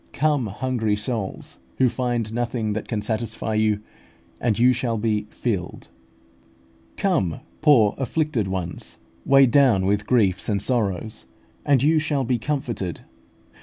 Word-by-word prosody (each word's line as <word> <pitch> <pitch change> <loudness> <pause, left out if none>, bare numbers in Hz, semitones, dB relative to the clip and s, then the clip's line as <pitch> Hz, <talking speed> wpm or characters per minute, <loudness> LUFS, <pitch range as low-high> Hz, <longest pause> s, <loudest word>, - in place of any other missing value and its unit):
ii. - - -33
13). - - -14
Come, 145 -5 +2
hungry 110 0 -1
souls, 105 - -5 0.2
who 130 - +4
find 120 -3 -2
nothing 115 -2 -1
that 110 - -4
can 105 -3 -2
satisfy 110 0 -3
you, 110 -1 +1 0.6
and 115 -4 0
you 125 +2 +5
shall 120 -2 -1
be 105 -1 -1
filled. 100 -8 -4 1.1
Come, 160 - 0 0.2
poor 130 -10 +5
afflicted 135 -4 -1
ones, 90 -3 -5 0.3
weighed 135 -2 +6
down 125 -9 +4
with 105 +1 0
griefs 100 -7 +2
and 100 -2 +1
sorrows, 110 -2 -1 0.4
and 135 -3 +3
you 155 +2 +4
shall 150 -3 0
be 125 -1 0
comforted. 120 - -3
115 Hz, 140 wpm, -23 LUFS, 105-130 Hz, 1.1 s, weighed